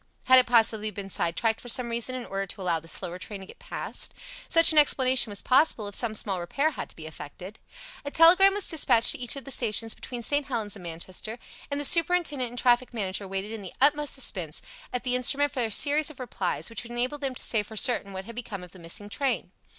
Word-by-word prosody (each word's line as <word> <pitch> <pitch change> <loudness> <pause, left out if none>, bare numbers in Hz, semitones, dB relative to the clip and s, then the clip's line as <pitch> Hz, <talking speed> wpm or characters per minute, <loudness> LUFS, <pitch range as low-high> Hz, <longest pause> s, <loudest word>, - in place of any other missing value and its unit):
Had 260 0 +8
it 250 - +1
possibly 220 -2 +3
been 195 -1 -7
sidetracked 220 +8 0
for 245 - -7
some 240 +1 +2
reason 235 +2 -2
in 250 -2 -5
order 195 0 -4
to 200 - -8
allow 170 -3 0
the 165 - -15
slower 175 +2 +2
train 200 +1 -8
to - - -9
go - - -12
past? - - -5 0.3
Such 330 -1 +6
an 310 - +6
explanation 260 -4 +4
was 200 -1 -4
possible 255 -5 +2
if 205 - -8
some 220 +1 0
small 195 -3 0
repair 275 - -1
had - - -6
to - - -16
be 160 - -10
effected. 160 +6 -10 0.4
A 285 - -4
telegram 365 +6 +6
was 410 - +1
dispatched 255 -8 +3
to - - -5
each 245 +1 -2
of 275 - -6
the 275 - -6
stations 225 -2 0
between 245 -2 -8
St. 285 +4 0
Helens 220 -5 -2
and 200 - -11
Manchester, 180 +6 -6 0.3
and 285 0 -3
the 290 - -2
superintendent 335 -6 +1
and 245 - -11
traffic 245 0 +2
manager 195 -2 -3
waited 195 +2 -4
in 225 -2 -6
the 190 - -10
utmost 295 +1 +3
suspense 180 - -2 0.3
at 250 - -3
the 250 -1 +1
instrument 280 +3 +2
for 260 - -2
the 230 - -1
series 295 +7 +4
of 305 - -13
replies 255 - -3
which 230 - -4
would 235 - -11
enable 250 +4 -2
them 270 -2 -3
to - - -4
say 220 - +2
for 215 +1 -10
certain 205 -3 +2
what 190 0 -7
had 230 - -8
become 220 -6 -6
of 180 - -12
the 185 - -15
missing 170 +5 -5
train. 270 +5 -2
235 Hz, 240 wpm, -26 LUFS, 200-270 Hz, 0.4 s, Had